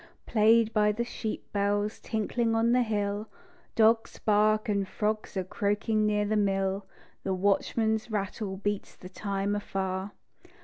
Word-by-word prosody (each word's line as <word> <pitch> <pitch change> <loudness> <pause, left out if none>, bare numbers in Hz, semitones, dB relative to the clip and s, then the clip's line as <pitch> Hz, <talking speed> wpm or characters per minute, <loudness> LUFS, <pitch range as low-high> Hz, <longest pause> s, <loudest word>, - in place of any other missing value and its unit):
Played 225 0 +4
by 210 -1 +4
the 225 +3 -2
sheep 225 -2 -5
bells 205 +1 0
tinkling 225 +1 -1
on 230 +1 +3
the 250 +1 +4
hill; 210 -2 -1 0.5
Dogs 225 0 +3
bark 215 +1 +2
and 200 -2 0
frogs 215 0 -2
are 190 - 0
croaking 210 +3 0
near 210 0 +1
the 215 +1 0
mill, 195 -1 0 0.4
The 190 -1 -1
watchman's 220 +4 +1
rattle 200 -1 -3
beats 205 0 -3
the 180 - -11
time 200 +1 -2
afar. 190 -1 -3
210 Hz, 140 wpm, -28 LUFS, 200-220 Hz, 0.5 s, Played